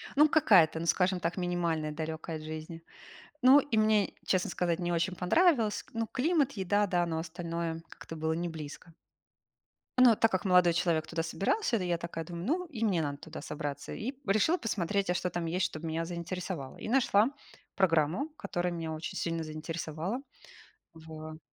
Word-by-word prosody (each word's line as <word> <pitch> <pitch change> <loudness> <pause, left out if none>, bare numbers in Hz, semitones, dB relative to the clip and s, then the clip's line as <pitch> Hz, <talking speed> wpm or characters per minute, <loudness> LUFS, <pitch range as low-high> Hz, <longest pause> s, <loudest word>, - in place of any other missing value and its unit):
Ну, 300 +2 +7
какая-то, 195 - +5
ну, 165 - -3
скажем 180 +2 +2
так, 170 +2 -2
минимальная, 170 -4 -1
далекая 160 +1 -4
от 155 - -10
жизни. 155 +1 -7 0.6
Ну, 265 +3 +8
и 265 -5 -1
мне, 215 -2 +3
честно 185 -1 +1
сказать, 170 -2 0
не 175 -1 -1
очень 170 +2 0
понравилось 230 - +3
к - - -24
Ну, 225 0 -1
климат, 285 +1 +1
еда, 205 +1 +1
да, 175 -2 +1
но 160 -1 -2
остальное 165 0 -4
как-то 165 - -10
было 160 0 -1
неблизко. 160 -1 -6 1.0
Но 255 -1 +8
а - - +3
так 225 +1 +3
как 185 0 -1
молодой 180 -2 +5
человек 165 -2 +1
туда 165 -1 -2
собирался, 230 - 0
то 190 - -2
я 175 -1 0
такая 165 -1 -5
думаю: 170 +1 -6
"Ну, 345 - 0
и 260 -10 -5
мне 190 -7 +2
надо 145 -2 -3
туда 160 +2 -9
собраться". 145 -1 -5
И 250 +6 -4
решила 215 - +3
посмотреть, 200 - -1
а - - +3
что 180 0 -1
там 175 -1 -3
есть, 175 +3 0
чтобы 160 +1 -5
меня 165 +1 -2
заинтересовало. 175 -4 -5
И - - -7
нашла 235 -3 +4 0.5
программу, 170 - +2
которая 175 0 -2
меня 165 -1 -4
очень 155 +1 -5
сильно 165 -1 -2
заинтересовала 160 - -4 0.8
в 155 -1 -9
175 Hz, 180 wpm, -30 LUFS, 160-205 Hz, 1.0 s, Ну